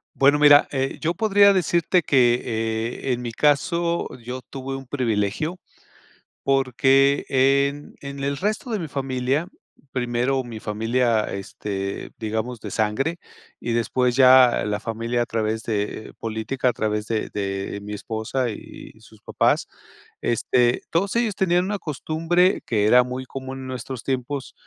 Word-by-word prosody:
Bueno 145 +2 +4
mira, 145 -1 +7
eh, 135 -1 -2
yo 165 +1 0
podría 200 0 +5
decirte 175 0 +2
que, 125 -5 +3
eh, 115 +2 -2
en 120 - -3
mi 120 -1 -4
caso 170 +6 +1
yo 125 +2 -7
tuve 135 +1 -6
un 135 -1 -8
privilegio, 125 - -1 0.8
porque 135 +1 +3
en 140 +2 +1
en 140 0 -7
el 140 0 -1
resto 215 - -2
de 220 - -1
mi 165 - -4
familia, 135 +3 -1 0.4
primero 125 +1 0
mi 115 -3 -8
familia, 115 +2 +1
este, 100 0 -5
digamos 110 +2 -3
de - - -7
sangre, 110 +10 0 0.4
y 120 - -3
después 120 +2 +1
ya 130 -2 +6
la 105 0 -1
familia 115 +2 -2
a - - -5
través 110 -1 -2
de 105 0 -3
política, 115 +4 -2
a - - -1
través 105 -1 -2
de 110 -2 -2
de 100 0 -3
mi 105 +1 -7
esposa 110 +4 -2
y - - -11
sus - - -18
papás. - - +1 0.6
Este, 120 +1 +2
todos 190 +5 0
ellos 235 -3 +1
tenían 180 -2 +2
una 205 +1 -2
costumbre 165 +4 +1
que 105 -3 +1
era 125 +4 +6
muy 125 +1 -5
común 130 0 -7
en 130 - -7
nuestros 130 -1 -6
tiempos, 135 +1 -3
130 Hz, 150 wpm, -23 LUFS, 115-145 Hz, 0.8 s, mira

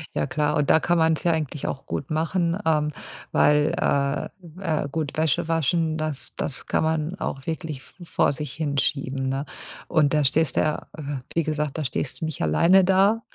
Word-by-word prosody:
Ja - - +1
klar, 150 -4 0
und 145 -1 +1
da - - +6
kann 175 +2 +1
man's 160 -1 +2
ja 170 - +3
eigentlich 150 -3 -3
auch 135 - -5
gut 140 - -4
machen, 165 +2 0
ähm, 150 -2 +2 0.4
weil, 150 0 +4
äh, 140 0 0 0.3
äh, 155 -6 0
gut, 155 -2 -3
Wäsche 160 0 +1
waschen, 165 0 +1
das 155 -3 -4
das 135 - -2
kann - - +1
man 160 +2 0
auch 135 -1 -4
wirklich 160 -4 -4
v 175 - -15
vor 165 - +2
sich 145 -1 -5
hin 145 -2 -2
schieben, 135 -1 -1
ne? 135 +2 -2 0.4
Und 155 -4 +3
da 150 -1 +3
stehst 140 +1 +2
du - - +5
ja- 155 -1 -1 0.5
wie 165 - +2
gesagt- 150 -1 -2
da 155 - -1
stehst 130 0 -3
du - - 0
nicht 160 -2 -5
alleine 170 - +5
da. 195 +4 +4
155 Hz, 195 wpm, -24 LUFS, 140-165 Hz, 0.5 s, da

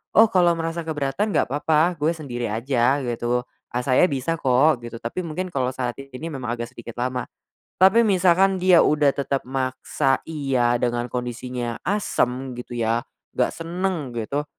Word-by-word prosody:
"Oh, 220 0 +7
kalau 175 -2 +4
ngerasa 165 0 -4
keberatan 150 +7 -1
gak - - +1
papa 155 +4 +2
gue 160 +3 +1
sendiri 125 -6 -4
aja," 125 +4 +1
gitu, 120 0 -1 0.3
"Ah, 125 +1 -2
saya 130 +7 +4
bisa 150 +3 -2
kok," 130 +2 +3
gitu, 120 0 -8
tapi 115 +9 -4
mungkin 180 +4 -4
kalo 130 -3 -1
saat 125 -2 -2
ini 135 +4 -7
memang 130 -4 -5
agak 120 0 -6
sedikit 120 -2 -10
lama. 125 0 -2 0.5
Tapi 215 +5 +6
misalkan 190 -1 +3
dia 185 -1 +6
udah 150 -1 +3
tetap 140 0 -1
maksa 130 +1 -1
iya 130 -6 +1
dengan 120 0 -1
kondisinya 125 -1 -4
asam 130 -10 -1
gitu 120 0 -7
ya, 115 0 +1 0.3
gak - - +2
senang 170 -5 -3
gitu, 140 +6 -2
135 Hz, 160 wpm, -23 LUFS, 125-165 Hz, 0.5 s, Oh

